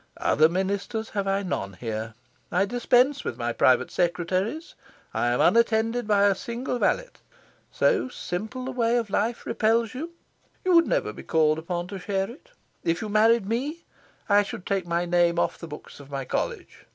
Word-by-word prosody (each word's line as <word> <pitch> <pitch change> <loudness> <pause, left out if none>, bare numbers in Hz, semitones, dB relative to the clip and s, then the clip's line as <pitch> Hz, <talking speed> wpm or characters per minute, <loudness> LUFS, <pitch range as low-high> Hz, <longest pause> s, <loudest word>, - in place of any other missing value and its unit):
Other 155 +1 +4
ministers 200 +5 -2
have 200 -2 -2
I 195 +1 +1
none 100 - -3
here. 110 +1 -5 0.4
I 185 +3 +2
dispense 245 +5 +2
with 120 - -4
my 120 -1 -2
private 130 +1 +3
secretaries. 185 - -1 0.4
I - - 0
am 120 0 +1
unattended 230 0 +3
by 205 -2 +4
a 200 -1 +5
single 235 +5 -4
valet. - - +1 0.6
So 415 - +2
simple 235 +5 -5
a - - -3
way 240 -1 +1
of 225 -4 -2
life 225 +4 -1
repels 230 +1 +1
you? 320 +7 -6 0.5
You 370 - +3
would 335 -1 +6
never - - 0
be - - -9
called 155 -1 +2
upon 175 +1 -3
to 195 - -6
share 195 +2 -2
it. 265 - -16 0.3
If 165 0 0
you 215 - -4
married 215 0 +4
me, 280 +9 -3 0.4
I 205 0 +5
should 195 -2 -7
take 195 -3 -1
my 170 +1 0
name 175 -1 +2
off - - 0
the 170 - -7
books 150 -1 -10
of 140 -1 -13
my 135 -2 -4
College. - - -4
200 Hz, 180 wpm, -26 LUFS, 170-235 Hz, 0.6 s, would